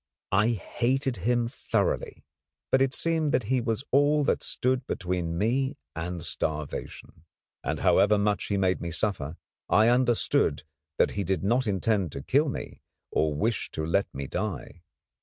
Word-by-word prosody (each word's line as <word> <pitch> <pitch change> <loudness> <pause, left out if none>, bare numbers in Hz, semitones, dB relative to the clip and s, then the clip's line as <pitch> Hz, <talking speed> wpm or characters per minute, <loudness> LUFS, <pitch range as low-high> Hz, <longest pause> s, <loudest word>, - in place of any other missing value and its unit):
I 105 +3 +4
hated 125 +4 -1
him 120 +5 +1
thoroughly; - - -2 0.5
but 130 - +4
it 135 0 +2
seemed 160 -3 +1
that 125 - +2
he 130 - +2
was 115 0 -1
all 145 +2 +4
that - - +1
stood 125 0 -1
between 90 -3 -2
me 130 - 0 0.2
and 85 0 -4
starvation, 75 +1 -4 0.4
and, - - -2
however 105 +1 +4
much 105 0 +1
he 100 - -1
made 95 -1 +1
me 85 - -3
suffer, 85 -4 -2 0.3
I 110 +2 +5
understood 120 - +2 0.3
that - - +3
he 100 - -2
did 95 +1 -1
not 120 +5 +2
intend 100 -3 +1
to 70 - -6
kill 145 +3 +2
me - - -6 0.3
or 75 -1 +1
wish 110 +9 -1
to 80 - -2
let 100 +5 +1
me 70 +1 -5
die. 90 - -4
105 Hz, 160 wpm, -27 LUFS, 90-125 Hz, 0.5 s, I